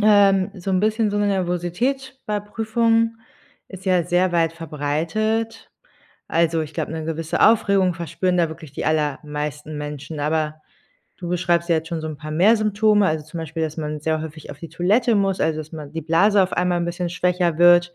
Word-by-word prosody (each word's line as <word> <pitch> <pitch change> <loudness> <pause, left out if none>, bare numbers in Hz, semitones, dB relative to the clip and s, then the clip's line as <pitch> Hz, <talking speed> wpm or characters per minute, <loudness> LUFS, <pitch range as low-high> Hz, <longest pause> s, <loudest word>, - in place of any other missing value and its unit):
ähm, 200 -2 +5
so 190 0 -5
'n 185 - +2
bisschen 215 +1 +1
so 205 - -1
'ne 205 - +2
Nervosität 200 +9 -1
bei 210 -1 -1
Prüfungen 225 +2 +1 0.5
ist 190 -1 -11
ja 180 -3 +2
sehr 180 +2 +2
weit 165 -1 +1
verbreitet. 165 +9 -2 0.6
Also, 165 -1 +1
ich 155 0 -7
glaube, - - -3
'ne 160 -1 -4
gewisse 165 0 -3
Aufregung 200 -5 +4
verspüren 170 +2 -1
da 170 -2 +2
wirklich 160 -3 -10
die - - -5
allermeisten 150 0 -2
Menschen, 150 +1 -6
aber, 155 +1 -1 0.6
du 175 - -6
beschreibst 175 -1 +1
ja 165 - +4
jetzt 160 +1 -3
schon 165 -1 -3
so 155 - -4
'n 155 - -6
paar 155 +1 -8
mehr 195 +9 +5
Symptome, 215 -1 +3
also 155 -1 -2
zum 160 +2 -8
Beispiel, 160 0 -4
dass 155 -1 -3
man 150 -1 -4
sehr 155 +1 0
häufig 155 -1 -8
auf - - -10
die 165 - -8
Toilette 205 +9 +2
muss, 195 -1 +1
also 160 0 +1
dass 155 0 -7
man 150 -3 -8
die 165 - -3
Blase 195 +6 +4
auf 185 - -2
einmal 180 0 +1
'n - - -1
bisschen 175 +1 -3
schwächer 180 -2 0
wird. 175 0 +5
175 Hz, 195 wpm, -22 LUFS, 155-200 Hz, 0.6 s, ähm